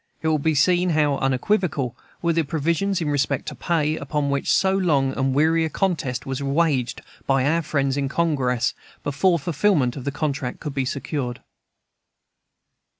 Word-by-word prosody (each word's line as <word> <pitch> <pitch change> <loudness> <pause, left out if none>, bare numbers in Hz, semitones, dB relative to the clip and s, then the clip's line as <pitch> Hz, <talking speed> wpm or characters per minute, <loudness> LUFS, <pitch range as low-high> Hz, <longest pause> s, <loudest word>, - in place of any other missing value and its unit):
It - - 0
will 155 -1 +2
be 155 +2 +1
seen 180 +5 +3
how 145 -2 +2
unequivocal 135 - 0 0.3
were 170 -1 +2
the 165 - +2
provisions 170 +5 0
in 150 -2 -1
respect 140 -1 0
to - - -8
pay, 155 -3 0
upon 140 0 -1
which 140 0 -1
so 190 0 +3
long 145 -8 +1
and 135 0 +1
weary 160 +3 +3
a 160 - 0
contest 155 -10 -1
was 135 +1 -3
waged 140 -3 0 0.3
by 135 -1 +2
our 165 +4 +2
friends 140 -3 0
in 140 -1 -1
Congress, 140 -7 +1 0.3
before 155 +6 +2
the 145 - -10
fulfilment 150 -6 +2
of 135 - -6
the 140 - -2
contract 140 -3 -3
could 150 -3 -5
be 135 -2 -1
secured. 130 -2 -3
145 Hz, 170 wpm, -23 LUFS, 135-165 Hz, 0.3 s, seen